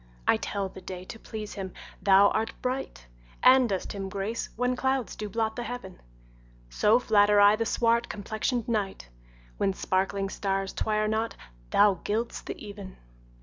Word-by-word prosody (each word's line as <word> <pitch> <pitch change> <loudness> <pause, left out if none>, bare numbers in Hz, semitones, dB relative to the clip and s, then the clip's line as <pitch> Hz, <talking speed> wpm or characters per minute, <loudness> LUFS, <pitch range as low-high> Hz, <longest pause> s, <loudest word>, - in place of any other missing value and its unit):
I - - +6
tell 200 -1 -3
the 190 - -11
day, 185 0 -7
to 225 - -9
please 215 -2 -7
him 190 -2 -6 0.3
thou 200 0 +6
art 225 +1 -1
bright, 250 - -3 0.4
And 255 -1 +7
dost 190 -2 -2
him 195 -1 -4
grace 200 +4 -3
when 250 +2 0
clouds 265 -2 -1
do 210 -1 -5
blot 220 0 -1
the 245 - -3
heaven: 240 -6 -7 0.7
So 210 - +4
flatter 210 -3 +4
I 205 +1 +7
the 225 +1 -1
swart 235 +1 +2
complexion'd 220 +3 -2
night, 205 - -2 0.5
When 195 - +1
sparkling 195 +1 -1
stars 195 -1 -2
twire 215 0 0
not 220 +1 -1 0.3
thou 205 - +4
gild'st 225 +3 -2
the - - -5
even. 200 -2 -9
210 Hz, 160 wpm, -28 LUFS, 195-230 Hz, 0.7 s, And